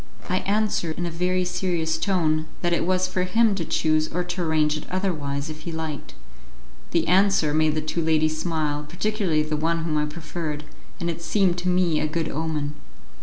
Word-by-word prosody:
I 185 - +3
answered 200 -5 0
in 175 - -1
a 170 - -3
very 180 +2 0
serious 175 -3 -1
tone 160 -5 +1 0.2
that 175 0 +2
it 170 - +1
was 185 0 +2
for 185 0 -1
him 215 +4 +3
to 190 -3 -2
choose 155 -1 +1
or 180 +2 0
to 180 +1 -4
arrange 155 -2 +2
it 155 - -6
otherwise, 150 -7 -1
if 155 -1 -7
he 170 - -5
liked. 160 -3 -5 0.7
The 170 - +1
answer 190 -4 +4
made 155 0 +3
the 155 - 0
two 155 +2 -2
ladies 155 -1 +2
smile, 155 -3 -1
particularly 180 -3 0
the 155 0 -2
one 165 +2 0
whom 155 -2 0
I 150 - +1
preferred, 155 -1 -5 0.4
and 170 - -2
it 170 0 -3
seemed 180 -1 +2
to 180 +1 -1
me 180 -3 +2
a 155 - +1
good 160 +1 -2
omen. 150 -1 -2
165 Hz, 195 wpm, -24 LUFS, 155-180 Hz, 0.7 s, answer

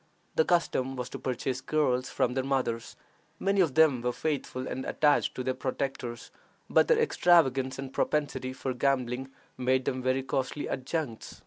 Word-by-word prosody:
The 160 - +4
custom 135 -6 +1
was 125 -1 -4
to - - -7
purchase 130 0 -2
girls 130 -5 +1
from 125 - 0
their 130 0 0
mothers. 130 -4 -1 0.4
Many 195 0 +2
of 160 -7 +1
them 155 -6 +5
were 125 +1 0
faithful 135 -2 -3
and 130 - -4
attached 150 -1 +2
to 130 - -3
their 130 - 0
protectors, 130 -3 -4 0.4
but - - +4
their 475 - +4
extravagance 160 - +3
and 135 -1 -6
propensity 135 -4 -1
for 130 0 -3
gambling 130 0 0 0.3
made 130 0 +2
them 130 0 -1
very 130 +1 +1
costly 135 +2 -2
adjuncts. 130 -3 -4
130 Hz, 160 wpm, -29 LUFS, 130-145 Hz, 0.4 s, them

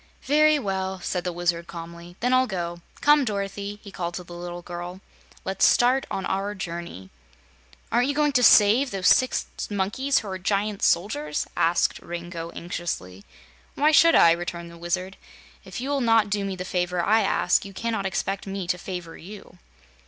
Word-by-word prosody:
"Very 305 +2 +4
well," 190 -5 -3
said 180 0 -3
the 180 - -2
Wizard 170 -1 -1
calmly; 170 +1 -9
"then 250 +2 +2
I'll 255 0 +4
go. 175 -3 -4 0.2
Come, 295 0 +5
Dorothy," 200 -2 -4
he 200 - -10
called 175 -2 -4
to 180 - -5
the 175 - -12
little 175 0 -7
girl, 175 +1 -7 0.5
"let's 190 0 -1
start 255 +2 +4
on 190 - -3
our 200 +2 -2
journey." 170 - -7 0.8
"Aren't 245 +2 +3
you 285 - -1
going 295 0 +2
to 255 -3 +2
save 230 +4 +6
those 190 -4 +2
six 255 - +3 0.2
monkeys 210 +8 0
who 215 - -1
are 190 -1 -5
giant 200 +2 -1
soldiers?" 150 -5 0
asked 170 +1 +2
Rango, 170 -1 -6
anxiously. 135 - -5 0.5
"Why 300 +2 +3
should 330 +2 +6
I?" 170 - +7
returned 170 0 -3
the 170 - -13
Wizard. 185 +3 -3 0.5
"If - - -7
you 265 +3 -3
will 280 -1 0
not 225 -3 +3
do 205 0 0
me 195 -1 -3
the 180 0 -6
favor 180 -1 -1
I 220 +4 +4
ask, 195 -3 +2
you 200 - -9
cannot 220 0 -2
expect 195 +1 -3
me 195 -1 -4
to 180 - 0
favor 175 -3 -6
you." 195 -1 -12
190 Hz, 180 wpm, -25 LUFS, 175-215 Hz, 0.8 s, I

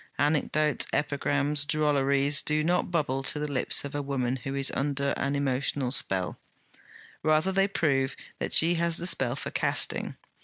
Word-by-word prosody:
Anecdotes, 150 +1 +1
epigrams, 145 0 0
drolleries, 145 -1 +2
do 150 0 +1
not 175 +3 +1
bubble 145 -6 0
to 135 - -1
the 150 0 -3
lips 135 +1 0
of 140 - -6
a 145 - -2
woman 135 -2 -1
who 135 +2 -5
is 135 0 -2
under 140 0 -1
an 140 0 -1
emotional 135 -1 -1
spell: 95 -8 -1 0.8
rather 155 +4 +2
they 195 +1 +2
prove 135 -8 0 0.2
that - - -3
she 165 +2 +5
has 170 -1 +1
the 175 - -4
spell 135 -8 +1
for - - -6
casting. - - 0
145 Hz, 160 wpm, -28 LUFS, 135-155 Hz, 0.8 s, she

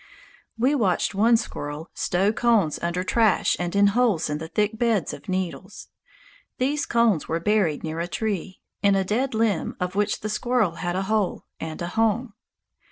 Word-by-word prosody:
We 255 +5 +2
watched 205 -11 +1
one 225 +4 +4
squirrel 150 -5 -6
stow 195 +4 +1
cones 220 -10 +2
under 175 +1 -1
trash 220 +1 +2
and 175 +1 -3
in 200 0 +5
holes 215 -10 +2
in 150 - -2
the 160 - -6
thick 210 +5 -1
beds 225 -9 +1
of 145 - -10
needles. 185 -2 -4 0.7
These 285 +4 0
cones 230 -8 +2
were 165 - -1
buried 185 -5 +1
near 160 0 -4
a 170 - -2
tree, 195 -1 -3 0.2
in 200 -1 +4
a 195 - +2
dead 230 +6 -1
limb 220 -6 0
of 180 0 -2
which 205 +1 0
the 215 - -3
squirrel 215 -5 0
had 175 0 -2
a 190 - 0
hole 215 -1 -1
and 160 -1 -6
a 170 - -3
home. 225 +3 0
200 Hz, 175 wpm, -24 LUFS, 175-225 Hz, 0.7 s, in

